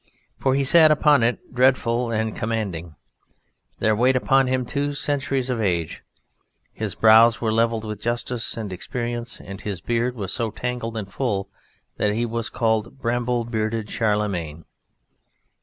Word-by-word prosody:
For 130 -1 +2
he 140 - +2
sat 155 +3 +6
upon 150 -2 +4
it, 115 +2 -1
dreadful 125 -2 +2
and 110 -1 -1
commanding: 95 -8 -3 0.8
there 110 0 +2
weighed 125 +4 +3
upon 135 +1 +3
him 130 0 0
two 145 +2 -2
centuries 140 -2 -1
of 120 -2 -1
age; 85 -6 -1 0.7
his 110 -4 -4
brows 115 +1 +6
were 110 -2 0
level 115 0 +2
with 105 -1 -6
justice 120 0 -2
and 105 -4 -4
experience, 120 +4 -4
and 100 +1 -9
his 100 -4 -4
beard 120 +4 -1
was 100 -5 -4
so 115 -3 -1
tangled 115 0 -4
and 100 -3 -6
full, 105 -7 -2 0.5
that 105 0 +1
he 120 +2 0
was 115 0 -3
called 110 +2 -1
"bramble 120 -1 -1
bearded 110 -1 -2
Charlemagne." 100 -8 -1
115 Hz, 150 wpm, -23 LUFS, 110-125 Hz, 0.8 s, sat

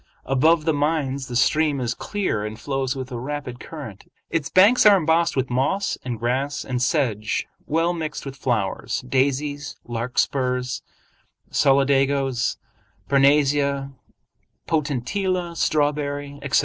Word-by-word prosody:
Above 155 +5 +3
the 160 - +2
mines 145 -3 -1
the 125 - -6
stream 150 +3 +2
is 120 -2 -1
clear 190 - -2
and 110 +1 -6
flows 135 +2 -2
with 130 0 -6
a 120 - -4
rapid 130 -2 -5
current. 135 -11 -9 0.2
Its 165 -4 -1
banks 205 +7 +6
are 205 -2 +8
embossed 165 0 +2
with 130 -1 -1
moss 140 +11 0
and 125 -2 -3
grass 130 +5 -1
and 125 -2 -2
sedge 125 -6 0 0.2
well 165 +3 +1
mixed 155 -4 -5
with 135 -1 -6
flowers—daisies, 135 +5 -1
larkspurs, 125 +2 -1 0.7
solidagos, 135 -2 +2 0.5
parnassia, 140 0 +3 0.8
potentilla, 170 - -1
strawberry, 145 -2 -1
etc. 140 -1 +2
140 Hz, 120 wpm, -23 LUFS, 125-150 Hz, 0.8 s, are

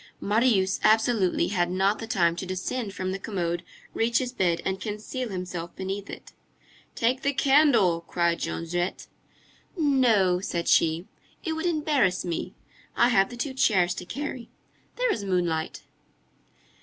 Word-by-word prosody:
Marius 205 -3 +2
absolutely 220 -3 +3
had 175 -3 0
not 190 +3 +1
the 225 - -6
time 170 -6 +2
to 190 - -4
descend 200 +4 -3
from 185 -1 -3
the 195 - -4
commode, 175 -4 -2 0.3
reach 235 +1 +1
his 255 -2 -1
bed, 175 -8 +1
and 190 0 -2
conceal 220 +4 -4
himself 180 -3 -5
beneath 195 +1 -5
it. - - -9 0.6
"Take 250 +3 +1
the 280 - 0
candle," 270 - +4
cried 170 -1 0
Jondrette. 175 +2 -3 0.7
"No," 240 - +3
said 170 -2 -3
she, 165 +2 +3 0.4
"it 325 - -2
would 320 +2 -2
embarrass 295 - +1
me, 170 -2 -4 0.4
I 240 - +4
have 195 -5 +3
the 245 - -9
two 265 +2 -3
chairs 190 -9 +3
to 180 - -7
carry. 260 +1 -5 0.5
There - - +1
is 205 - -4
moonlight." 175 -4 -1
195 Hz, 145 wpm, -26 LUFS, 180-245 Hz, 0.7 s, candle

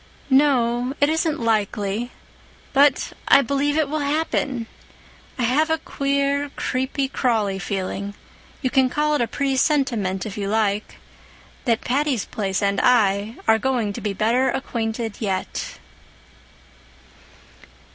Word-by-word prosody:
"No, 255 -2 +3
it 285 - +4
isn't 320 -1 0
likely. 215 +1 0 0.6
But 280 -1 +3
I 280 - +7
believe 280 +3 0
it 310 -2 +2
will 305 +2 -2
happen. 285 -4 -1 0.7
I 250 - -1
have 285 +7 +2
a 320 - +2
queer, 280 0 -1
creepy, 265 +1 -1
crawly 220 -7 0
feeling—you 200 +6 -5
can 265 -2 +3
call 300 +3 +1
it 295 - +1
a 235 - +1
presentiment, 260 - 0
if 210 -1 -6
you 200 - -2
like—that 215 +3 -3
'Patty's 270 -3 0
Place' 195 -1 -2
and 200 0 +1
I 215 -2 +3
are 220 0 +5
going 240 -5 0
to - - -6
be 205 -2 -2
better 235 +6 +2
acquainted 225 -4 -3
yet." 195 -4 -3
245 Hz, 120 wpm, -22 LUFS, 210-280 Hz, 0.7 s, I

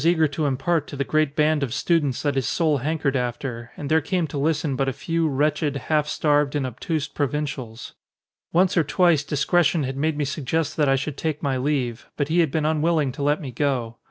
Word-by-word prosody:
eager 165 -1 +4
to 145 +1 -2
impart 145 +3 0
to - - -7
the 140 - -1
great 155 0 0
band 155 0 +2
of 135 -4 -2
students 150 -7 +1
that 145 -1 +1
his 135 -4 -1
soul 155 -3 +2
hankered 145 0 -1
after, 120 -1 -3
and 145 - -5
there 160 +2 +3
came 180 -1 0
to 150 - -8
listen 150 -1 0
but 135 +1 0
a - - -3
few, 165 +4 -1
wretched, 145 +1 0
half 150 +3 0
starved, 150 -1 +1
and 145 -2 0
obtuse 140 +5 -3
pro 145 - -1
vincials. 130 -5 -5 0.6
Once 180 +2 +3
or 170 - +4
twice 170 -1 +3
discretion 155 +2 +2
had 135 0 -3
made 150 +2 0
me 150 - 0
suggest 150 +2 -2
that 150 -3 +2
I 135 - +4
should 135 +1 -3
take 155 -2 -3
my 140 -2 +1
leave, 130 -3 -2
but 145 0 -1
he 170 +2 +2
had 165 -3 +3
been 155 +2 -1
un 155 -1 +1
willing 155 -4 +2
to 135 - -8
let 145 +2 +2
me 140 -7 -6
go. 125 -3 -1
145 Hz, 225 wpm, -23 LUFS, 135-160 Hz, 0.6 s, eager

